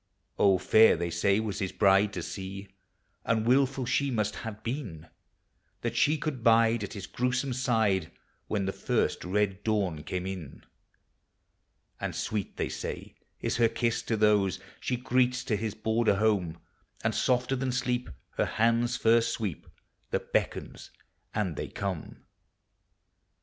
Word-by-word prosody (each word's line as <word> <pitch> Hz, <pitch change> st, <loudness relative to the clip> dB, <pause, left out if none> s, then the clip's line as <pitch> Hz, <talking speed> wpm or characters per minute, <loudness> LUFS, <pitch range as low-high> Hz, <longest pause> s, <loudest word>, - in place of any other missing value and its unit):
Oh, 100 Hz, -2 st, +5 dB
fair 110 Hz, +5 st, +5 dB
they 85 Hz, 0 st, -2 dB
say, 100 Hz, +4 st, +2 dB
was 110 Hz, -2 st, -3 dB
his 95 Hz, -2 st, -2 dB
bride 100 Hz, 0 st, +4 dB
to -, -, -4 dB
see, 95 Hz, 0 st, -6 dB, 0.5 s
And 110 Hz, -1 st, +1 dB
wilful 135 Hz, +1 st, +3 dB
she 140 Hz, +3 st, +1 dB
must 105 Hz, -4 st, -1 dB
have 110 Hz, -1 st, -7 dB
been, 115 Hz, -, -5 dB, 0.8 s
That 120 Hz, 0 st, -2 dB
she 150 Hz, +6 st, +3 dB
could 145 Hz, -7 st, -4 dB
bide 115 Hz, -1 st, +4 dB
at 100 Hz, -, -5 dB
his 100 Hz, -4 st, -6 dB
gruesome 125 Hz, +3 st, -1 dB
side 110 Hz, -9 st, +1 dB, 0.4 s
When 100 Hz, -2 st, -1 dB
the 95 Hz, -, -2 dB
first -, -, 0 dB
red 100 Hz, +1 st, 0 dB
dawn 100 Hz, -8 st, 0 dB
came 90 Hz, +3 st, -4 dB
in. 95 Hz, -7 st, -7 dB, 1.4 s
And -, -, -3 dB
sweet, 105 Hz, -4 st, -3 dB
they -, -, 0 dB
say, -, -, -6 dB, 0.3 s
is -, -, -1 dB
her 115 Hz, -2 st, +4 dB
kiss 115 Hz, 0 st, 0 dB
to 110 Hz, -, -1 dB
those 105 Hz, -4 st, +3 dB, 0.2 s
She 125 Hz, -, -1 dB
greets 125 Hz, 0 st, +1 dB
to 110 Hz, -, 0 dB
his 110 Hz, 0 st, -3 dB
border 110 Hz, 0 st, +2 dB
home; 100 Hz, -6 st, +1 dB, 0.5 s
And -, -, +1 dB
softer 125 Hz, +1 st, +1 dB
than 130 Hz, 0 st, -1 dB
sleep 125 Hz, -2 st, -1 dB, 0.3 s
her -, -, +3 dB
hand's 115 Hz, +2 st, +2 dB
first 115 Hz, +1 st, +3 dB
sweep 105 Hz, -9 st, -4 dB, 0.4 s
That -, -, -3 dB
beckons, -, -, -2 dB, 0.5 s
and 100 Hz, -7 st, -1 dB
they -, -, -4 dB
come. 95 Hz, -5 st, -5 dB
110 Hz, 150 wpm, -29 LUFS, 95-120 Hz, 1.4 s, Oh